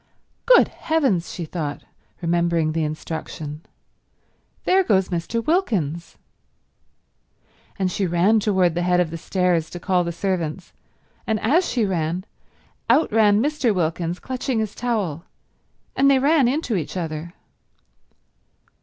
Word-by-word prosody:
"Good - - +6
heavens," 270 - 0
she 170 - -5
thought, 155 -3 -5 0.4
remembering 170 -2 +1
the 160 0 -1
instruction, 155 -1 -5 1.0
"there 380 +1 +4
goes 190 - +2
Mr. 190 +6 -2
Wilkins!" 190 - -1 1.6
And 190 -2 0
she 195 +1 -1
ran 180 +6 +3
toward 190 -5 +2
the 175 - -1
head 180 0 +2
of 175 -3 +1
the 165 - -4
stairs 180 -3 0
to 175 - -7
call 180 0 +1
the 170 - -3
servants, 170 -1 -3 0.5
and 220 -1 0
as 310 +12 +2
she 240 -3 +1
ran, 175 -1 -2 0.6
out 270 +7 +4
ran 210 0 +4
Mr. 285 -7 +1
Wilkins 170 0 -1
clutching 255 +2 -3
his 220 -2 -1
towel, 205 -10 -2 0.7
and 275 +1 +4
they 275 - +5
ran 280 0 +3
into 260 -3 -1
each 175 +1 -3
other. 165 0 -5
185 Hz, 130 wpm, -22 LUFS, 170-230 Hz, 1.6 s, Good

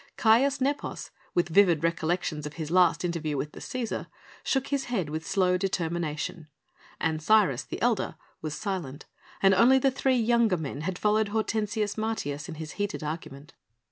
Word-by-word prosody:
Caius 265 +5 +4
Nepos, 280 +2 -2 0.2
with 175 - +2
vivid 170 -3 +4
recollections 165 -2 -1
of 150 - -9
his 160 -1 -5
last 180 -1 +4
interview 160 -4 -2
with 150 +2 -3
the - - -11
Cæsar, 250 -3 -4 0.4
shook 270 -1 0
his 280 -1 -1
head 190 -11 -2
with 160 +1 -3
slow 180 -2 +2
determination. 165 -4 -2 0.5
Ancyrus, 160 - +2
the - - -7
elder, 235 -8 +1 0.3
was 155 -1 -4
silent 180 -10 -4 0.4
and 195 0 +6
only 240 +7 +6
the 270 +1 +3
three 260 0 +1
younger 230 -4 +3
men 145 -2 -5
had 180 +3 -3
followed 215 +1 +2
Hortensius 215 0 -1
Martius 170 -9 -3
in 165 - -6
his 155 -1 -7
heated 205 -5 -2
argument. 150 -1 -6
180 Hz, 160 wpm, -27 LUFS, 155-220 Hz, 0.5 s, and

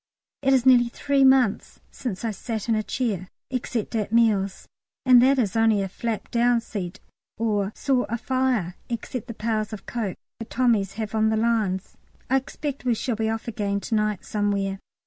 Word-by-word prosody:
It 270 -1 +2
is 260 -2 +3
nearly 245 -2 +6
three 280 +2 +1
months 265 -5 +3
since 235 -3 -5
I 225 - 0
sat 220 +2 -5
in 230 - +2
a 215 - +2
chair, 210 -5 -2 0.2
except 245 -3 -3
at 210 -2 -1
meals, 210 -4 +2 0.4
and 250 -2 +8
that 270 +2 +4
is 220 -6 0
only 225 -3 +3
a - - -2
flap 220 +3 -4
down 240 0 +3
seat, 195 -6 -6 0.4
or 210 -3 0
saw 265 -3 +1
a 235 - -1
fire, 250 -7 0 0.2
except 240 +1 -4
the 230 - -7
pails 220 -1 -1
of 215 - -8
coke 220 -6 -3 0.2
the 225 - -5
Tommies 220 -6 +1
have 220 0 -5
on 220 0 +3
the 220 - +1
lines. 215 -5 0 0.3
I 265 - +5
expect 280 +1 -5
we 245 -2 +2
shall 240 +1 -2
be 220 0 -1
off 225 +1 -3
again 205 -3 -1
to - - -5
night 210 -2 0
somewhere. 200 -2 -1
225 Hz, 185 wpm, -25 LUFS, 205-245 Hz, 0.4 s, and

